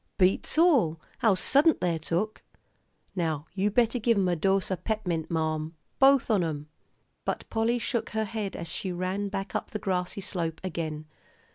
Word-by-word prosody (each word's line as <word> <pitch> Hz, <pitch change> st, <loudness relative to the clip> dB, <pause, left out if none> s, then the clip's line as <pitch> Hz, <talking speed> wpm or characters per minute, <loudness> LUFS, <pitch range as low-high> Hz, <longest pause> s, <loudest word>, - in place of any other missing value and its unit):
"Beats 190 Hz, +9 st, +2 dB
all, 265 Hz, -, +4 dB, 0.2 s
how 220 Hz, -4 st, +4 dB
suddint 285 Hz, -, +4 dB
they're 170 Hz, -2 st, 0 dB
took. 175 Hz, +7 st, -2 dB, 0.7 s
Now 160 Hz, -5 st, -1 dB
you 200 Hz, +2 st, +1 dB
better 235 Hz, +3 st, +2 dB
give 230 Hz, 0 st, +2 dB
'em 190 Hz, -2 st, +2 dB
a 175 Hz, -, +2 dB
dose 195 Hz, +3 st, +1 dB
o' -, -, +2 dB
pep'mint, 180 Hz, -4 st, -2 dB
marm, 160 Hz, -1 st, -1 dB, 0.2 s
both 270 Hz, -3 st, +5 dB
on 200 Hz, -5 st, +3 dB
'em." 150 Hz, -2 st, -4 dB, 0.5 s
But -, -, -3 dB
Polly 225 Hz, +1 st, +1 dB
shook 235 Hz, 0 st, -2 dB
her 220 Hz, -1 st, -1 dB
head 210 Hz, -2 st, -4 dB
as 170 Hz, -, -5 dB
she 185 Hz, +3 st, -3 dB
ran 185 Hz, +3 st, -2 dB
back 195 Hz, -2 st, -4 dB
up -, -, -2 dB
the -, -, -3 dB
grassy 185 Hz, -1 st, -2 dB
slope 165 Hz, -4 st, -3 dB
again. 160 Hz, -4 st, -4 dB
190 Hz, 170 wpm, -28 LUFS, 165-220 Hz, 0.7 s, both